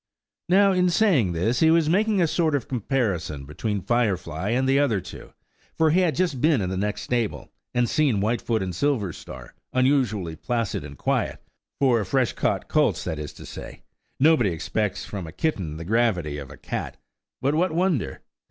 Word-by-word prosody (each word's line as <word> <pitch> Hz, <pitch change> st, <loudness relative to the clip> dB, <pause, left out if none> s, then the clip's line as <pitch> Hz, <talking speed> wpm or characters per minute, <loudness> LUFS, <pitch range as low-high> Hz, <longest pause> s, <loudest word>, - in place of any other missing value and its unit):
Now, 195 Hz, +2 st, +5 dB
in 180 Hz, -1 st, +3 dB
saying 170 Hz, -, +3 dB
this, 110 Hz, +9 st, 0 dB
he 160 Hz, -, +5 dB
was 165 Hz, -1 st, +4 dB
making 200 Hz, +2 st, +2 dB
a -, -, +3 dB
sort 160 Hz, -2 st, +1 dB
of 135 Hz, -, -2 dB
comparison 105 Hz, -, -2 dB
between 100 Hz, +7 st, -3 dB
Firefly 95 Hz, -6 st, 0 dB
and 130 Hz, +3 st, +1 dB
the 135 Hz, +1 st, +4 dB
other 125 Hz, -9 st, +2 dB
two; 90 Hz, -, -10 dB, 0.5 s
for 160 Hz, -1 st, +4 dB
he 175 Hz, -, +4 dB
had 175 Hz, -4 st, +2 dB
just 170 Hz, -8 st, 0 dB
been 155 Hz, -4 st, +4 dB
in 95 Hz, -2 st, -2 dB
the -, -, -2 dB
next 105 Hz, +2 st, -2 dB
stable, 120 Hz, -4 st, -2 dB, 0.2 s
and 120 Hz, 0 st, +3 dB
seen 140 Hz, -8 st, +2 dB
Whitefoot 110 Hz, +1 st, 0 dB
and 90 Hz, -1 st, -4 dB
Silverstar 105 Hz, -, -3 dB, 0.2 s
unusually 130 Hz, -, +1 dB
placid 115 Hz, -, -2 dB
and 70 Hz, -1 st, -10 dB
quiet–for 120 Hz, -, -1 dB
fresh 125 Hz, +5 st, +1 dB
caught -, -, -1 dB
colts, -, -, +2 dB
that 80 Hz, -, -3 dB
is 75 Hz, -1 st, -5 dB
to -, -, -12 dB
say; -, -, -9 dB, 0.4 s
nobody 140 Hz, -7 st, +4 dB
expects 95 Hz, +4 st, -2 dB
from 95 Hz, -5 st, -6 dB
a -, -, -8 dB
kitten 90 Hz, -, -2 dB
the 85 Hz, -, -7 dB
gravity 90 Hz, -9 st, +1 dB
of 70 Hz, -2 st, -8 dB
a 75 Hz, -, -11 dB
cat. -, -, -5 dB, 0.4 s
But 140 Hz, +2 st, +1 dB
what 175 Hz, +3 st, +2 dB
wonder? 165 Hz, -, 0 dB
120 Hz, 180 wpm, -24 LUFS, 95-150 Hz, 0.5 s, Now